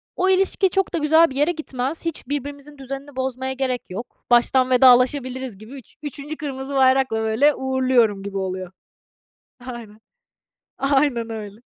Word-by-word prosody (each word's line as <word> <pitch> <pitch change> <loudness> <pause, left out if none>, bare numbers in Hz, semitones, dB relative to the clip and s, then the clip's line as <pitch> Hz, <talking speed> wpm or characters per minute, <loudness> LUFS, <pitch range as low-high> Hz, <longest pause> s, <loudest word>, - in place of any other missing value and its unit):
o 375 +1 +1
ilişki 385 0 +3
çok 385 +1 0
da - - 0
güzel 320 +1 +4
bir 265 - -9
yere 295 +5 +2
gitmez. 300 -1 -4
Hiç 330 - -4
birbirimizin 285 +1 -5
düzenini 275 +1 -8
bozmaya 260 0 -3
gerek 255 -4 -3
yok. 210 +7 -9
"Baştan 255 +2 +4
vedalaşabiliriz." 255 -2 +3
gibi 215 +4 -13
üç 265 -5 -13
üçüncü 295 +2 -6
kırmızı 275 -2 -5
bayrakla, 260 -3 +3
böyle, 230 +7 +3
uğurluyorum 255 -6 +1
gibi 200 -1 -5
oluyor. 185 -1 -4 1.0
Aynen. 230 -4 -9 0.8
Aynen 270 -4 +1
öyle. 215 -1 -7
265 Hz, 145 wpm, -22 LUFS, 240-285 Hz, 1.0 s, güzel